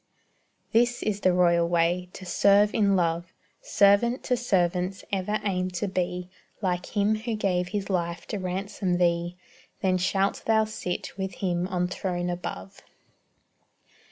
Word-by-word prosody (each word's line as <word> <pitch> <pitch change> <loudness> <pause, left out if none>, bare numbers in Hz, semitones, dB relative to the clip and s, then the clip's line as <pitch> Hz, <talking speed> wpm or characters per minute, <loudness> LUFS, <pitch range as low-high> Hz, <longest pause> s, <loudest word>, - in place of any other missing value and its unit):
This 240 +1 +2
is 205 -2 -1
the 185 - +3
royal 170 -1 +3
way 175 +1 +1
to 185 - -9
serve 200 +3 +4
in 200 -2 +3
love 170 -1 0 0.3
Servant 205 +5 +3
to 250 - +1
servants 185 -5 0
ever 200 +2 -1
aim 185 -2 0
to 205 - -1
be 180 -1 -2 0.3
Like 180 0 -2
Him 205 +1 +3
who 225 +1 -3
gave 180 -4 0
His 200 +1 -3
life 170 -3 -2
to 210 - -3
ransom 185 0 -2
thee; 175 0 +1 0.5
Then 185 -1 +2
shalt 195 +2 0
thou 220 -1 +4
sit 180 -4 -5
with 190 -1 -3
Him 180 -2 -1
on 180 -2 -1
throne 180 -1 -2
above. 95 - -6
185 Hz, 145 wpm, -26 LUFS, 175-200 Hz, 0.5 s, serve